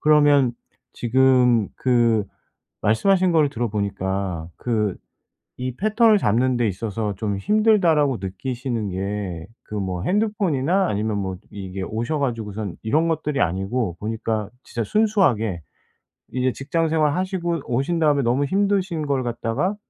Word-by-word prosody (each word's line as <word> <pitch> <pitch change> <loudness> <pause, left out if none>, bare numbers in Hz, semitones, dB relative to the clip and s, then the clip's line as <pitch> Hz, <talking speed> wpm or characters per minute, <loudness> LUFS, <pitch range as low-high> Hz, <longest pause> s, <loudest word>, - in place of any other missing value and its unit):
그러면 145 -4 +4 0.4
지금 125 -3 +3
그 115 -4 +2 1.0
말씀하신 185 -2 +3
거를 155 -3 +3
들어 120 -4 -2
보니까 95 -4 -2
그 105 -5 -1 0.6
이 125 -1 -4
"패턴을 215 +1 +4
잡는 125 - +2
데 120 -2 +2
있어서 105 +1 -3
좀 100 -1 -2
힘들다."라고 175 - +3
느끼시는 115 +3 -3
게 95 -3 -4 0.2
그 105 - -8
뭐 95 -3 -2
핸드폰이나 190 - +1
아니면 105 0 -1
뭐 95 -2 -3
이게 95 -1 -6
오셔 115 +10 -2
가지고선 110 -7 -3
이런 155 +9 +2
것들이 150 -3 -1
아니고 95 +3 -1
보니까 110 -1 -2
진짜 115 - -4
순수하게 140 - +2 0.7
이제 130 0 +1
직장 160 +4 -1
생활하시고 170 +1 0
오신 135 +8 0
다음에 145 -3 +3
너무 125 +4 +2
힘드신 190 -2 0
걸 135 -2 0
갖다가 120 - -1
125 Hz, 295 characters per minute, -22 LUFS, 105-155 Hz, 1.0 s, 그러면